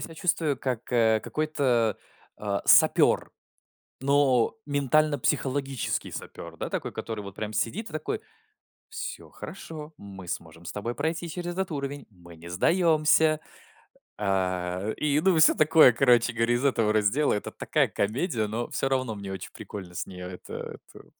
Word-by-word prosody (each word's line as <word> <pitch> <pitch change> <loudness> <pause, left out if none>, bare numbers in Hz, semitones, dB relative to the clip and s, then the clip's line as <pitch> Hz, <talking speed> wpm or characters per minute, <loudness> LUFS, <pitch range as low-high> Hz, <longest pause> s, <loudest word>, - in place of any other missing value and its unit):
себя 165 - -7
чувствую 160 -4 0
как, 125 -2 -3
э, 110 -2 +4
какой-то, 130 -8 0 0.4
а, 100 -1 -2
сапер. - - +5 0.7
Но 135 - +3
ментально-психологический 140 -2 0
сапер, - - -8
да, - - -4
такой, - - -3
который 110 -2 -5
вот 100 -1 -10
прям 110 0 -4
сидит 165 - -2
и - - -14
такой: 155 -1 -3 0.7
"Всё 470 +2 -6
хорошо, 160 -4 -9
мы 95 -4 -10
сможем 85 0 -6
с 85 - -5
тобой 110 +5 -4
пройти 160 +5 -2
через 175 +1 -4
этот 190 0 -2
уровень. 140 -1 -4
Мы 85 -4 -15
не 85 +2 -11
сдаемся". 155 - +3 0.8
Э, 95 0 -1
и, 150 0 +1
ну, 185 -1 +3
всё 155 - +7
такое, 155 -4 +6
короче 120 -1 +4
говоря, 115 +1 +1
из 120 - -1
этого 115 -6 +2
раздела. 110 +8 +2
Это 105 - -3
такая - - +1
комедия, 110 - -1
но 115 +2 -3
всё 135 - -1
равно 130 -4 0
мне 100 -1 -7
очень 95 - -7
прикольно 95 -4 -9
с - - -3
нее. 90 -1 -8
Это 90 - -8 0.2
это - - -13
125 Hz, 155 wpm, -27 LUFS, 105-155 Hz, 0.8 s, всё